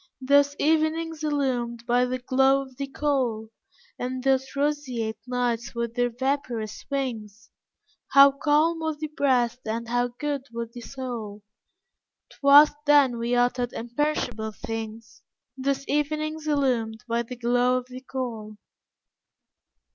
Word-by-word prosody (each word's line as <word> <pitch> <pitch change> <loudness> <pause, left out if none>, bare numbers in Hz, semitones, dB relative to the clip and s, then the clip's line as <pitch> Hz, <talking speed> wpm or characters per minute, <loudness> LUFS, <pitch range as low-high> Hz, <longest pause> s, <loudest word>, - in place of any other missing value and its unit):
Those 285 +2 +3
evenings 320 +1 0
illumed 250 -6 -1
by 245 +1 +3
the 255 +1 -2
glow 265 +2 +2
of 265 -1 -15
the 275 0 -3
coal, 260 -6 -1 0.5
And 255 +1 -3
those 265 0 +1
roseate 260 -7 -1
nights 245 -1 -2
with 235 -1 -2
their 245 0 +1
vaporous 245 -4 -3
wings, 240 -5 -4 0.6
How 275 0 +7
calm 305 +4 +2
was 315 -2 -2
thy 310 0 -5
breast 250 -5 +2
and 230 +1 -3
how 245 +1 +1
good 280 +2 -4
was 235 0 -5
thy 240 - -9
soul, 230 -5 -6 0.9
'Twas 285 +2 +7 0.2
then 280 -5 +5
we 235 +1 0
uttered 245 0 +1
imperishable 235 -3 -2
things, 225 +1 -7 0.3
Those 275 +1 -2
evenings 305 +1 -1
illumed 245 -6 0
by 235 0 0
the 235 +2 -7
glow 245 +1 +2
of 250 - -4
the 255 0 -10
coal. 230 -5 -5
255 Hz, 130 wpm, -25 LUFS, 235-280 Hz, 0.9 s, How